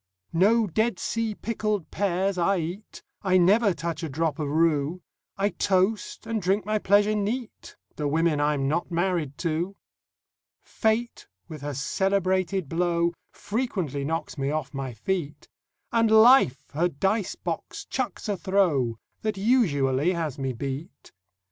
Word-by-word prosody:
No 215 +7 +4
Dead 220 +3 0
Sea 225 +1 -2
pickled 215 -5 -2
pears 195 0 0
I 185 +2 +2
eat; 175 +5 -6 0.2
I 185 -2 +3
never 200 +4 +4
touch 165 -2 -4
a 160 - -3
drop 155 +1 -1
of 150 -2 -2
rue; 160 +2 +1 0.3
I 200 +1 +2
toast, 200 +3 0
and 225 -1 -2
drink 195 +3 +1
my 215 0 0
pleasure 205 +2 +3
neat, 215 +4 -4 0.2
The 150 - -1
women 155 0 +1
I'm 145 -2 +1
not 170 +5 -1
married 170 -5 -1
to! 170 +4 -1 0.9
Fate 225 +1 -1 0.2
with 155 -3 -9
her 145 -1 -4
celebrated 190 +3 0
blow 170 +1 +1 0.2
Frequently 195 - -3
knocks 160 0 -3
me 135 0 0
off 150 -2 -3
my 135 -2 -4
feet; 150 - -3 0.4
And 230 -1 +3
Life 220 - +5
her 165 +5 +2
dice 195 +6 -1
box - - -5
chucks - - -3
a 205 - 0
throw 170 - +1 0.2
That 215 -2 -2
usually 175 - +2
has 160 -6 -3
me 135 -1 -1
beat. 135 - -6
180 Hz, 140 wpm, -26 LUFS, 150-205 Hz, 0.9 s, Life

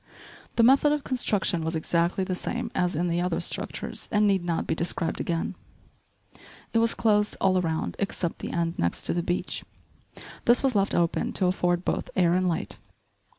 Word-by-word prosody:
The 230 - +4
method 270 +4 +5
of 295 -2 -2
construction 205 -9 0
was 160 +1 -2
exactly 170 +3 0
the 185 - -2
same 180 - -3
as 180 -2 0
in 175 +3 0
the 170 0 0
other 180 -2 0
structures - - -3
and 210 -1 +3
need 195 -3 +2
not 170 -1 -1
be - - 0
described 165 0 -1
again. 165 -1 -2 1.2
It 230 - +4
was 230 0 +2
closed 210 -2 +2
all 185 -1 +3
around 160 -2 -2
except 185 -3 -2
the - - -5
end 170 0 -1
next 85 - 0
to - - +1
the 175 - 0
beach. 175 +1 -2 0.8
This 240 +3 +5
was 270 -2 +2
left 200 -1 +1
open 170 -1 +1
to 185 - +2
afford 180 -1 +1
both - - -1
air 175 -2 +3
and 185 0 +2
light. 165 - -3
180 Hz, 185 wpm, -26 LUFS, 170-205 Hz, 1.2 s, method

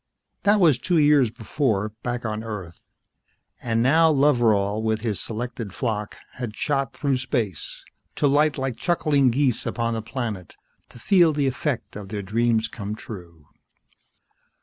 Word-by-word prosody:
That 205 +1 +4
was 155 -9 +4
two 175 -2 +1
years 145 -5 +5
before, 110 -2 -1
back 120 0 -3
on 110 0 -3
Earth. 100 -7 -7 0.8
And 115 -1 0
now 160 +5 +5
Loveral 115 -8 +3
with 110 -1 0
his 110 -4 -2
selected 115 -3 -5
flock 105 -4 -3 0.2
had 120 -4 -5
shot 140 -2 -1
through 140 -3 0
space, 115 - -3 0.3
to - - 0
light 145 +2 +3
like 130 -3 -3
chuckling 150 -6 +2
geese 130 -1 +1
upon 115 -1 -1
the 110 - -2
planet, 110 - -5 0.3
to - - -15
feel 170 - +4
the 145 -1 0
effect 135 0 -2
of 100 -2 -8
their 105 -1 -4
dreams 115 +3 +1
come 105 -1 -6
true. 85 -8 -11
120 Hz, 150 wpm, -24 LUFS, 110-140 Hz, 0.8 s, years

